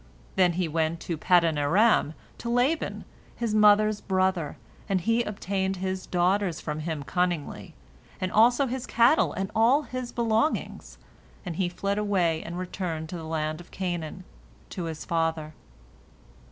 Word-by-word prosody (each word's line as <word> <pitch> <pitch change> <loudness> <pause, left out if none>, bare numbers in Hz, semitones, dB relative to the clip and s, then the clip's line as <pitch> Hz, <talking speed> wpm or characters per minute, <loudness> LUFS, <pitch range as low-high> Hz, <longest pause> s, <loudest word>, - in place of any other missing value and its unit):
Then 180 -2 +4
he 180 0 -1
went 160 +1 -1
to 170 - -3
Paddan 165 -1 +3
aram, 165 +1 +3 0.2
to 235 - -4
Laban, 250 +7 0 0.3
his 230 -3 -2
mother's 210 0 +5
brother, 185 -5 0 0.3
and 190 -2 +1
he 230 +6 +2
obtained 195 -3 -2
his 185 0 -4
daughters 180 0 +1
from 150 0 -4
him 155 -2 -4
cunningly, 175 -1 -2 0.4
and 185 0 -2
also 240 +5 +5
his 255 0 -4
cattle 240 +7 +4
and 190 +1 -4
all 245 +7 +4
his 255 -3 -5
belongings, 235 +5 -1 0.5
and 170 -3 -5
he 185 -2 +1
fled 200 +3 -2
away 180 -6 +1
and 170 +1 -6
returned 175 -3 -4
to 180 - -6
the 165 - -7
land 155 0 -3
of 175 - -16
Canaan, 175 -1 -4 0.5
to 180 - -4
his 160 -2 -6
father. 165 -2 -1
185 Hz, 150 wpm, -27 LUFS, 165-215 Hz, 0.5 s, mother's